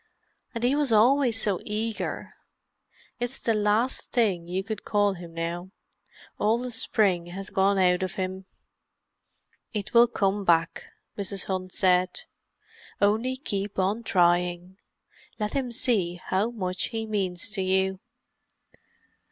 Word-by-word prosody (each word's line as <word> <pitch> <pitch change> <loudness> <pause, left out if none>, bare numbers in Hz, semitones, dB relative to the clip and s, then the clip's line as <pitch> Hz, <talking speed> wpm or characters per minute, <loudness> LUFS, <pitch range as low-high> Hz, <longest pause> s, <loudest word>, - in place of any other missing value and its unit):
And 230 - -3
he 250 +2 +3
was 290 -4 +2
always 240 +2 +4
so 205 -4 +1
eager. 215 +1 -3 0.9
It's 245 +2 -2
the 230 - +1
last 215 +4 0
thing 195 -8 +1
you 185 +2 -2
could 215 0 -5
call 205 -1 +2
him 175 -2 -10
now. 170 +2 -4 0.7
All 215 +2 +3
the 250 +1 -5
spring 195 -6 +1
has 190 +3 -6
gone 195 0 +3
out 180 -1 +3
of 185 -1 -2
him." 190 0 -4 1.3
"It 205 -3 -4
will 235 0 +7
come 200 -3 0
back," 165 -2 +2 0.3
Mrs. 200 -1 -3
Hunt 185 -1 -3
said. 185 - +2 0.8
"Only 220 +6 +2
keep 205 -6 -4
on 195 +4 +1
trying—let 180 +3 -1
him 265 -3 -1
see 205 -7 +1
how 195 +5 +1
much 185 -5 -3
he 225 -1 -4
means 195 -4 -2
to 200 -2 -2
you." 190 0 +1
200 Hz, 130 wpm, -26 LUFS, 185-225 Hz, 1.3 s, will